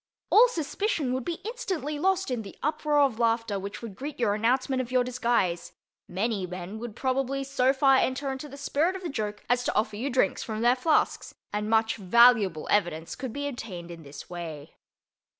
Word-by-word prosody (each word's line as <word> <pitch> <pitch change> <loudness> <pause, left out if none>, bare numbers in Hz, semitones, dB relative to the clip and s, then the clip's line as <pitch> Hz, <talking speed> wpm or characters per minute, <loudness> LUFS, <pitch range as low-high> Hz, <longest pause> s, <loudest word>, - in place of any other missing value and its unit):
All 475 +3 +8
suspicion 330 - -1
would 260 0 -2
be 340 -1 -3
instantly 375 - -3
lost 380 -2 +1
in 245 -3 -1
the 200 -3 -11
uproar 300 0 +2
of 265 -5 +2
laughter 230 -3 +1
which 200 +4 -7
would 225 -4 -6
greet 280 +6 -6
your 220 -4 +2
announcement 255 +5 +1
of 250 -1 -7
your 255 -1 +3
disguise; 235 -8 0 0.3
many 195 0 -1
men 180 +4 -7
would 230 -2 -7
probably 270 +1 -1
so 265 -1 +2
far 270 0 +4
enter 265 +2 0
into 265 +3 -6
the 280 - -10
spirit 300 +6 0
of 380 - -7
the 345 - -3
joke 210 -5 -4
as 245 +1 +2
to - - -1
offer 215 0 0
you 260 +6 -2
drinks 250 -7 +1
from 220 -1 -4
their 240 +2 +4
flasks, 305 +5 +1 0.2
and 210 +1 -2
much 225 0 +2
valuable 205 -4 +4
evidence 170 -5 0
could 255 -2 -5
be 285 +4 -3
obtained 185 -10 -7
in 170 -1 -9
this 145 -1 -10
way. 160 -4 -7
245 Hz, 195 wpm, -27 LUFS, 210-275 Hz, 0.3 s, All